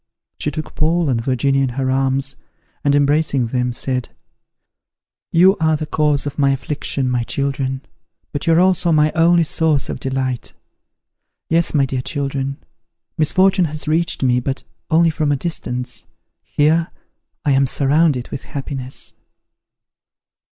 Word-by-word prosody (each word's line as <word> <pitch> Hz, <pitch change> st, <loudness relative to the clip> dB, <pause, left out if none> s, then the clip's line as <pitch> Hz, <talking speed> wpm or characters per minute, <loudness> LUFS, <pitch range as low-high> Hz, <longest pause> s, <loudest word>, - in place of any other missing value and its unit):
She -, -, -1 dB
took 155 Hz, +1 st, -6 dB
Paul 165 Hz, 0 st, +1 dB
and 115 Hz, -3 st, 0 dB
Virginia 135 Hz, +2 st, +1 dB
in 135 Hz, -, +1 dB
her 130 Hz, -1 st, 0 dB
arms, 135 Hz, +1 st, 0 dB, 0.5 s
and, 140 Hz, 0 st, +3 dB
embracing 145 Hz, -2 st, +2 dB
them, 125 Hz, +1 st, -1 dB
said, 125 Hz, 0 st, -3 dB, 1.2 s
"You 185 Hz, +4 st, +6 dB
are 160 Hz, -1 st, +2 dB
the 155 Hz, -, -4 dB
cause 150 Hz, -2 st, +1 dB
of 145 Hz, +1 st, -5 dB
my 140 Hz, -1 st, +4 dB
affliction, 135 Hz, 0 st, -2 dB
my 125 Hz, -1 st, +1 dB
children, 135 Hz, +1 st, -2 dB, 0.5 s
but 145 Hz, -, -4 dB
you 165 Hz, -, +5 dB
are 165 Hz, -, +5 dB
also 180 Hz, -1 st, +3 dB
my 155 Hz, -1 st, +4 dB
only 170 Hz, +1 st, +4 dB
source 155 Hz, -2 st, +1 dB
of -, -, -4 dB
delight! 130 Hz, -2 st, -3 dB, 1.0 s
Yes, 165 Hz, 0 st, +2 dB
my 140 Hz, -2 st, +4 dB
dear 130 Hz, -1 st, -2 dB
children, 140 Hz, -1 st, -3 dB, 0.6 s
misfortune 185 Hz, +4 st, +3 dB
has 150 Hz, -2 st, -5 dB
reached 165 Hz, -1 st, 0 dB
me, 125 Hz, -1 st, +3 dB
but 135 Hz, +2 st, -3 dB, 0.3 s
only 165 Hz, 0 st, +4 dB
from 155 Hz, -2 st, 0 dB
a -, -, +3 dB
distance: 125 Hz, -7 st, -5 dB, 0.4 s
here, 160 Hz, +3 st, +1 dB, 0.6 s
I 145 Hz, -, +3 dB
am 135 Hz, 0 st, +3 dB
surrounded 140 Hz, -1 st, +2 dB
with -, -, -5 dB
happiness." 135 Hz, -2 st, -6 dB
140 Hz, 145 wpm, -19 LUFS, 130-160 Hz, 1.2 s, You